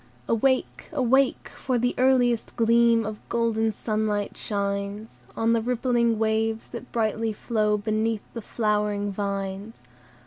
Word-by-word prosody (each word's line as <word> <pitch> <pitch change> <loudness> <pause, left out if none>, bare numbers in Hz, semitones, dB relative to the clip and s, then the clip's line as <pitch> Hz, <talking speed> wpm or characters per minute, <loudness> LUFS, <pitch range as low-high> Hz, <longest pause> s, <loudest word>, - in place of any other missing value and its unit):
"Awake! 260 +3 0
awake! 265 0 +2
for 255 -2 -2
the 245 +1 +1
earliest 250 -3 +2
gleam 230 0 +4
Of 215 0 -5
golden 225 -1 +1
sunlight 215 -1 -2
shines 200 - -3 0.2
On 225 +1 +2
the 230 - +2
rippling 240 -1 +1
waves, 220 0 0
that 245 +1 -9
brightly 225 0 0
flow 210 -1 0
Beneath 215 +1 -1
the 230 - -5
flowering 210 -2 -1
vines. 200 +1 -4
225 Hz, 125 wpm, -25 LUFS, 210-235 Hz, 0.2 s, gleam